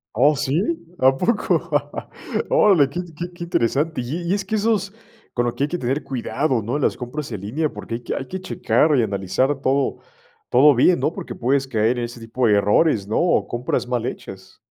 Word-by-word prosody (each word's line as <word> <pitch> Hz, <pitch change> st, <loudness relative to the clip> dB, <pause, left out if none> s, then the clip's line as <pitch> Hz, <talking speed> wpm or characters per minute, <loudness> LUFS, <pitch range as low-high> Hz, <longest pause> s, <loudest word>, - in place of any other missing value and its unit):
¿Oh, 145 Hz, +6 st, +4 dB
sí?, 135 Hz, 0 st, -1 dB, 0.4 s
¿a 135 Hz, +1 st, +4 dB
poco?, 205 Hz, -, +1 dB, 0.9 s
órale, 180 Hz, -10 st, +5 dB
qué 175 Hz, -, -5 dB
int 170 Hz, -4 st, -8 dB
qué 175 Hz, +2 st, -5 dB
qué 175 Hz, 0 st, -7 dB
interesante. 155 Hz, +1 st, 0 dB
Y 140 Hz, +9 st, -4 dB
y -, -, +3 dB
es 200 Hz, -1 st, -3 dB
que 205 Hz, -, -6 dB
esos, 210 Hz, -2 st, 0 dB, 0.4 s
con 120 Hz, -, 0 dB
lo 120 Hz, -, -2 dB
que -, -, -1 dB
hay -, -, +2 dB
que 175 Hz, +3 st, -3 dB
tener 130 Hz, +4 st, -1 dB
cuidado 130 Hz, 0 st, -1 dB
¿no?, 120 Hz, +7 st, -2 dB
las 150 Hz, -, +1 dB
compras 130 Hz, +3 st, -6 dB
en 105 Hz, -4 st, -5 dB
línea, 135 Hz, +11 st, -1 dB
porque 115 Hz, -, -6 dB
hay 120 Hz, -, -6 dB
que -, -, -3 dB
hay 130 Hz, -, -5 dB
que 185 Hz, -, -5 dB
checar 155 Hz, -5 st, +1 dB
y 130 Hz, -, +4 dB
analizar 105 Hz, +7 st, 0 dB
todo 135 Hz, +1 st, 0 dB, 0.5 s
todo 140 Hz, +3 st, +6 dB
bien, 170 Hz, +8 st, +4 dB
¿no? -, -, +1 dB
Porque -, -, -7 dB
puedes 135 Hz, +2 st, 0 dB
caer 115 Hz, -1 st, +1 dB
en 120 Hz, -, -2 dB
ese 120 Hz, +1 st, -9 dB
tipo 115 Hz, +2 st, -2 dB
de 110 Hz, -, +4 dB
errores, 105 Hz, +1 st, +2 dB
¿no?, 110 Hz, -, -1 dB
o 175 Hz, 0 st, +2 dB
compras 120 Hz, 0 st, -2 dB
mal 120 Hz, -2 st, -1 dB
hechas. 95 Hz, -6 st, -8 dB
135 Hz, 210 wpm, -21 LUFS, 120-160 Hz, 0.9 s, todo